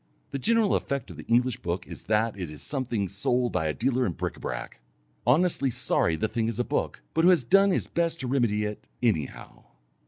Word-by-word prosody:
The 140 Hz, -, -3 dB
general 225 Hz, -, +3 dB
effect 140 Hz, -3 st, -2 dB
of -, -, -11 dB
the -, -, -10 dB
English 120 Hz, +1 st, +2 dB
book 85 Hz, +1 st, -3 dB
is -, -, -10 dB
that 110 Hz, 0 st, +1 dB
it 90 Hz, -5 st, -5 dB
is 75 Hz, -1 st, -8 dB
something 120 Hz, -8 st, -2 dB
sold 120 Hz, +6 st, 0 dB
by 80 Hz, -, 0 dB
a 75 Hz, -, 0 dB
dealer 130 Hz, +1 st, +1 dB
in 100 Hz, -8 st, 0 dB
bric -, -, -3 dB
à -, -, -15 dB
brac, -, -, -5 dB, 0.5 s
honestly 145 Hz, 0 st, +3 dB
sorry 85 Hz, -7 st, +2 dB
the 110 Hz, -, 0 dB
thing 115 Hz, +1 st, -1 dB
is 115 Hz, 0 st, -3 dB
a -, -, +3 dB
book, 145 Hz, -, -2 dB
but 165 Hz, -, +2 dB
who 175 Hz, -, +7 dB
has 175 Hz, -7 st, +4 dB
done 195 Hz, +10 st, +5 dB
his 190 Hz, -, +1 dB
best 170 Hz, -1 st, -1 dB
to 130 Hz, -, -3 dB
remedy 120 Hz, -5 st, +1 dB
it, 105 Hz, 0 st, -6 dB, 0.2 s
anyhow! 80 Hz, -, -2 dB
120 Hz, 220 wpm, -27 LUFS, 105-140 Hz, 0.5 s, who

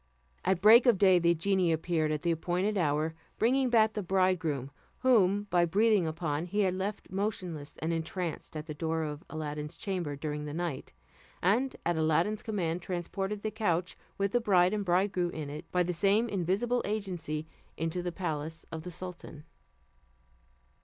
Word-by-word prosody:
At 185 Hz, -1 st, +1 dB
break 230 Hz, +5 st, +8 dB
of 235 Hz, -5 st, +6 dB
day, 185 Hz, -2 st, +5 dB
the 170 Hz, 0 st, +3 dB
genie 185 Hz, 0 st, +2 dB
appeared 160 Hz, -1 st, 0 dB
at 155 Hz, +1 st, -2 dB
the 170 Hz, -, +2 dB
appointed 180 Hz, +5 st, 0 dB
hour, 155 Hz, -2 st, +1 dB, 0.2 s
bringing 255 Hz, +3 st, +2 dB
back 220 Hz, -2 st, +4 dB
the 210 Hz, -, -2 dB
bridegroom, 175 Hz, -8 st, 0 dB, 0.3 s
whom 205 Hz, -6 st, +4 dB
by 175 Hz, 0 st, +4 dB
breathing 205 Hz, 0 st, +3 dB
upon 160 Hz, 0 st, -2 dB
he 205 Hz, +4 st, 0 dB
had 185 Hz, -2 st, +2 dB
left 195 Hz, +2 st, -4 dB
motionless 180 Hz, -7 st, -3 dB
and 165 Hz, +2 st, -2 dB
entranced 165 Hz, -1 st, -4 dB
at 155 Hz, -, -5 dB
the 155 Hz, -, -6 dB
door 160 Hz, +1 st, -1 dB
of 150 Hz, -1 st, -5 dB
Aladdin's 150 Hz, -1 st, -5 dB
chamber 180 Hz, -7 st, -3 dB
during 150 Hz, +1 st, -4 dB
the 150 Hz, 0 st, -5 dB
night, 170 Hz, -5 st, -4 dB, 0.5 s
and 240 Hz, +9 st, +1 dB
at 170 Hz, -1 st, +1 dB
Aladdin's 165 Hz, +7 st, +1 dB
command 180 Hz, -6 st, -2 dB
transported 195 Hz, +3 st, -3 dB
the 215 Hz, -, -1 dB
couch 180 Hz, -5 st, -1 dB, 0.2 s
with 200 Hz, 0 st, 0 dB
the 245 Hz, -, +2 dB
bride 185 Hz, -3 st, +4 dB
and 210 Hz, -1 st, -1 dB
bridegroom 180 Hz, -1 st, +1 dB
on 145 Hz, -2 st, -5 dB
it, 150 Hz, -, -9 dB
by 180 Hz, 0 st, +3 dB
the 180 Hz, +1 st, -2 dB
same 200 Hz, +7 st, +3 dB
invisible 205 Hz, +5 st, 0 dB
agency, 180 Hz, -7 st, -3 dB, 0.3 s
into 165 Hz, +2 st, -2 dB
the 175 Hz, 0 st, -3 dB
palace 160 Hz, -3 st, -4 dB
of 160 Hz, -, -5 dB
the 180 Hz, -, -7 dB
sultan. 175 Hz, -4 st, -8 dB
180 Hz, 170 wpm, -30 LUFS, 160-200 Hz, 0.5 s, break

